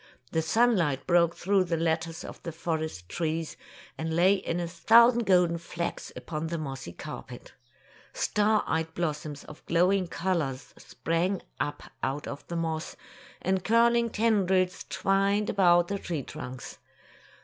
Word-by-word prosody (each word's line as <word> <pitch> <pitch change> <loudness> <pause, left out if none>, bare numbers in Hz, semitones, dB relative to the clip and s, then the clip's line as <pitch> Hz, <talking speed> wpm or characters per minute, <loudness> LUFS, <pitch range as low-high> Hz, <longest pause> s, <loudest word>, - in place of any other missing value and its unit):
The 160 - +1
sunlight 170 - +2
broke 170 -1 +3
through 195 0 +2
the 170 -1 -1
lattice 165 0 -1
of - - -9
the 170 - -5
forest 160 - -4
trees, 160 - -2 0.4
and 160 0 -2
lay 180 +3 +5
in 180 -3 -2
a 170 - -2
thousand 230 +6 +5
golden 180 -3 +4
flecks 170 0 -5
upon 155 0 -4
the 170 +1 -3
mossy 135 - -6
carpet. 130 - -9 0.6
Star 210 +1 +1
eyed 160 +1 -2
blossoms 150 -3 -3
of 155 - -13
glowing 180 +2 +3
colors 170 -8 -2
sprang 175 +4 -2 0.2
up 145 - -3 0.2
out 135 +3 -2
of 140 - -7
the 170 - -5
moss, 160 -1 -3 0.5
and 190 0 0
curl 235 +2 +4
ing 235 0 +2
tendrils 190 -5 +1
twined 195 +2 +1
about 175 -3 +4
the 200 0 -2
tree 160 -7 -4
trunks. 130 -3 -8
170 Hz, 145 wpm, -28 LUFS, 160-195 Hz, 0.6 s, lay